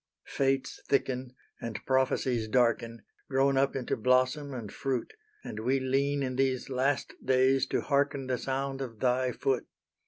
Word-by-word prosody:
Fates 135 -1 -1
thicken, 130 -2 0 0.3
and 115 -2 -4
prophecies 130 -3 +1
darken, 115 0 +1 0.3
Grown 135 0 +3
up 135 +1 +2
into 130 -3 -1
blossom 130 +4 +2
and 115 -6 -6
fruit; 130 -3 -2 0.3
And 105 - -6
we 130 +5 +1
lean 140 +2 +1
in 130 -1 -3
these 135 -1 0
last 135 +2 0
days 130 +1 +3
to - - 0
hearken 140 -1 +1
The 130 -1 -1
sound 135 0 -2
of 115 -5 -6
Thy 125 0 +2
foot. 130 +1 -1
130 Hz, 150 wpm, -30 LUFS, 125-135 Hz, 0.3 s, Grown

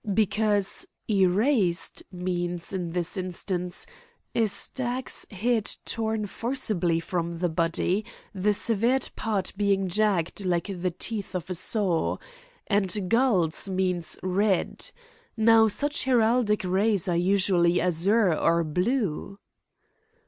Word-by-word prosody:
"Because 210 -1 +1 0.2
'erased' 195 - +2
means, 175 -1 -3
in 180 -3 -3
this 180 +1 -1
instance, 180 -1 -3 0.5
a 225 -2 +2
stag's 255 +4 -1
head 220 +2 0
torn 220 -1 -2
forcibly 210 -7 -1
from 170 0 -3
the 175 +1 0
body, 165 +5 0 0.3
the 205 +2 +1
severed 235 +5 +1
part 210 -4 -1
being 195 -1 +1
jagged 195 -1 0
like 180 +1 -1
the 180 - +1
teeth 200 +3 -4
of 180 0 -4
a - - +1
saw. 185 -1 +1 0.5
And 200 -1 +1 0.2
'gules' 205 -9 +2
means 185 -3 0
'red.' 190 +1 0 0.5
Now, 225 0 +6
such 290 +8 0
heraldic 230 -4 +2
rays 195 +1 +1
are 175 - +1
usually 180 -1 +3
azure 180 +3 +2
or 165 +2 +2
blue." 185 - -1
195 Hz, 110 wpm, -26 LUFS, 175-220 Hz, 0.5 s, Now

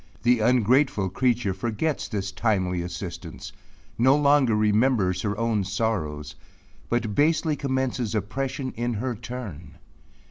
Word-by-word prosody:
The 120 0 +4
ungrateful 120 -1 +3
creature 120 -3 +1
forgets 120 +10 -2
this 100 -2 -3
timely 95 -3 0
assistance 90 +1 -7 0.5
no 130 +3 +5
longer 140 -5 +4
remembers 105 -2 +2
her 105 -1 -2
own 115 -3 +1
sorrows 90 -8 -2 0.6
but 120 -3 0
basely 155 +3 +2
commences 130 -5 -1
oppression 130 +5 -2
in 120 0 -2
her 125 +4 -2
turn. 105 - -8
115 Hz, 115 wpm, -25 LUFS, 100-130 Hz, 0.6 s, no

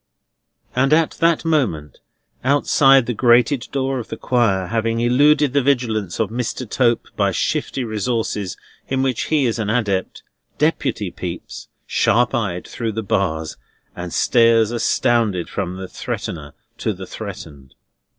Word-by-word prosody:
And 135 +3 +3
at 160 0 +3
that 165 0 +2
moment, 115 - -1 0.4
outside 135 -1 +4
the 120 - -2
grated 120 +2 +3
door 135 -1 -1
of 115 - -7
the - - -6
Choir, 110 -7 +1
having 115 +3 -1
eluded 140 +4 +3
the 140 - +3
vigilance 115 -9 0
of 110 -2 0
Mr. 125 +1 -3
Tope 120 +1 +1
by - - +1
shifty 135 - -1
resources 110 -3 -2 0.3
in 130 0 0
which 130 -3 -1
he 150 -4 +1
is 115 -1 -1
an 105 -2 -1
adept, 105 -5 -1 0.3
Deputy 130 - 0
peeps, 90 -1 -7 0.2
sharp 120 +1 +2
eyed, 100 -8 -2
through 115 -2 -4
the 110 +1 -3
bars, 80 -6 -1 0.4
and 90 -1 -6
stares 115 0 +3
astounded 115 -5 +1
from 95 -2 -3
the 95 0 -6
threatener 75 -4 -6 0.3
to 110 - -1
the 95 0 -8
threatened. 80 -11 -9
115 Hz, 140 wpm, -20 LUFS, 100-130 Hz, 0.4 s, outside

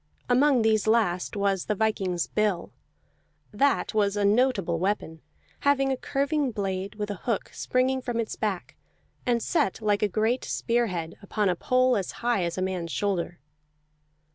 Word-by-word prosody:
Among 255 -1 +4
these 220 -1 +2
last 210 -6 +1
was 200 -2 0
the 210 - 0
viking's 190 -5 0
bill. 210 -5 -1 0.8
That 275 +5 +1
was 205 -1 +1
a 205 - +2
notable 205 -6 +2
weapon, 175 -4 -2 0.4
having 275 -1 +2
a - - +1
curving 280 +2 0
blade 195 -2 -3
with 210 -1 -3
a 205 +4 -6
hook 225 - -1
springing 260 +1 0
from 245 -2 -3
its 225 - -2
back, 200 -4 -3 0.5
and 235 -2 +2
set 190 - +1
like 210 -2 +1
a 210 - +3
great 220 +5 0
spearhead 200 -9 -1
upon 200 0 0
a 180 - +1
pole 255 +6 +2
as 195 -4 -2
high 240 -6 +2
as 170 0 -2
a 185 - 0
man's 180 -3 -3
shoulder. 180 -3 -1
210 Hz, 160 wpm, -26 LUFS, 190-245 Hz, 0.8 s, Among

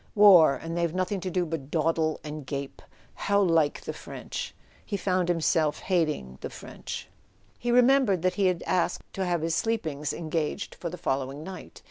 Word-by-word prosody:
"War—and 170 -5 +6
they've 170 -1 0
nothing 185 +2 0
to 185 - -3
do 180 0 0
but 155 -4 -5
dawdle 160 0 +1
and 150 -1 -6
gape! 140 +1 -5 0.3
How 200 0 +1
like 165 -6 +3
the - - -5
French!" - - -6 0.3
He 205 - -3
found 185 -2 0
himself 160 -2 +2
hating 155 - -1
the - - -4
French. - - -7 0.5
He 240 - -3
remembered 250 -7 +4
that 185 0 +2
he 195 -1 +2
had 180 -2 0
asked 180 -1 0
to 190 - -1
have 175 -3 0
his 165 0 0
sleep 225 +1 0
ings 150 -1 -2
engaged 160 -2 -3
for 170 - -5
the 180 - -7
following 135 +1 -2
night. 190 +2 -9
170 Hz, 175 wpm, -27 LUFS, 155-185 Hz, 0.5 s, War—and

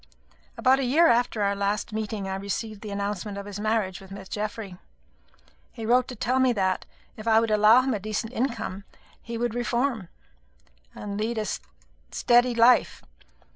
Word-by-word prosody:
About 260 +1 +4
a - - 0
year 290 +7 +4
after 235 -5 +2
our 200 0 +2
last 200 +2 -2
meeting, 215 -2 -3
I 190 - -3
received 200 +2 -4
the 215 - -7
announcement 200 0 -3
of 200 - -6
his 205 0 -7
marriage 215 -4 -1
with 190 - -13
Miss 195 0 -9
Geoffry. 210 -3 -5 0.9
He 225 -3 -7
wrote 250 +2 +3
to 255 - -7
tell 250 +4 0
me 260 -1 +4
that, 190 -3 -1 0.3
if 215 +1 -8
I 220 0 +6
would 225 -1 0
allow 215 +3 +6
him 260 0 -1
a 210 - -2
decent 215 +3 -4
income, 235 -6 -3 0.4
he 235 -1 -6
would 240 -1 -1
reform 240 -3 -1 0.9
and 205 0 -5
lead 225 +2 -2
a 215 - -1 0.6
steady 240 - +3
life. 235 +2 +4
220 Hz, 175 wpm, -26 LUFS, 200-240 Hz, 0.9 s, I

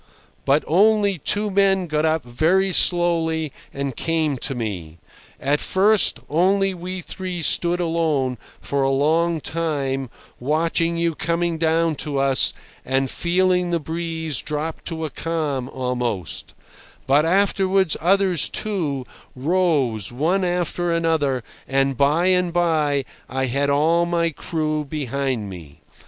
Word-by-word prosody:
but 140 +3 +3
only 200 +1 +3
two 205 +7 0
men 195 -1 +3
got 155 -1 0
up 160 0 +1
very 165 +11 +1
slowly 165 -4 +2 0.2
and 140 -2 -4
came 160 -3 0
to 130 +1 -4
me. 90 -9 -5 0.4
At 145 +2 +1
first 205 +2 +3
only 190 +5 +2
we 180 +1 -6
three 180 -1 -5
stood 175 +4 +1
alone, 160 -7 0 0.2
for 140 -1 -2
a 135 - +2
long 160 +5 +2
time, 140 -5 -2 0.3
watching 165 +4 0
you 170 0 0
coming 170 +1 -1
down 165 0 +2
to 145 -2 -3
us, 135 -1 +3 0.3
and 135 0 0
feeling 180 0 +1
the 170 -1 0
breeze 160 0 -2
drop 155 +1 -4
to 160 -1 -4
a 155 - -5
calm 150 -6 -3
almost; 125 - -3 0.5
but 140 +3 +4
afterwards 190 0 +2
others, 185 -1 +3
too, 155 -11 -2 0.3
rose, 140 - +1
one 165 +10 0
after 175 -1 -1
another, 160 -6 0 0.2
and 135 0 +1
by 145 +7 +2
and 180 -1 +2
by 155 -5 +1 0.2
I 130 +1 -1
had 140 +3 0
all 165 +4 +2
my 170 -1 +1
crew 155 -1 -2
behind 135 -5 -3
me. 85 -7 -11
160 Hz, 130 wpm, -22 LUFS, 140-175 Hz, 0.5 s, but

